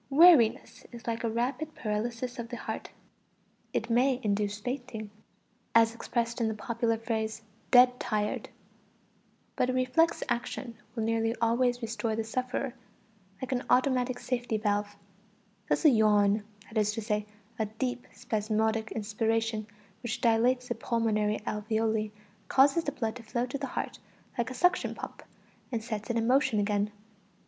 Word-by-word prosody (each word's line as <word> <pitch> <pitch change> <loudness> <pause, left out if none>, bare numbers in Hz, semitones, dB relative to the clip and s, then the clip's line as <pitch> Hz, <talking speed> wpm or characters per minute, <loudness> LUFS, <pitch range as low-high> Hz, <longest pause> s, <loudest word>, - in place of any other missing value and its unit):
Weariness 275 -6 +5
is 235 -2 -10
like 230 0 -2
a 230 - +1
rapid 255 +7 -2
paralysis 235 +3 -3
of 230 -1 -5
the 240 - -5
heart; - - -5 0.8
it - - -1
may 250 +2 +3
induce 205 0 0
fainting, 245 -3 -5 0.6
as 230 0 +6
expressed 235 0 -2
in 225 - +2
the 220 - -1
popular 230 +1 0
phrase 220 -1 -3 0.3
"dead 250 0 +7
tired"; 210 -1 -1 1.1
but 255 - +1
a - - +1
reflex 255 +6 +2
action 240 0 -3 0.2
will 225 - -1
nearly 225 +1 +1
always 245 +1 +2
restore 225 0 -1
the 225 - -1
sufferer, 255 +3 -2 0.7
like 260 - -4
an 255 0 0
automatic 255 -1 +3
safety 240 -3 -1
valve; 205 -1 -1 0.7
thus - - +1
a - - +10
yawn, 210 -2 +4 0.2
that 215 +1 -2
is 210 0 +2
to 225 - -3
say, 210 -1 -1 0.3
a 220 - +1
deep, 245 +3 -3
spasmodic 220 -1 -1
inspiration, 220 0 -1 0.3
which 240 -1 -3
dilates 245 +2 +3
the - - 0
pulmonary 215 -2 0
alveoli, 220 0 0 0.4
causes 285 +5 +4
the 285 - 0
blood 225 -4 -2
to - - -10
flow 235 +2 -2
to 255 +2 -5
the 275 - -3
heart - - -4 0.4
like 235 0 -1
a 255 - -6
suction 360 +4 +2
pump, - - -8 0.5
and 230 -3 -2
sets 215 -2 -4
it 235 - +1
in 225 - +1
motion 250 -3 +3
again. 205 0 +1
230 Hz, 155 wpm, -30 LUFS, 220-250 Hz, 1.1 s, a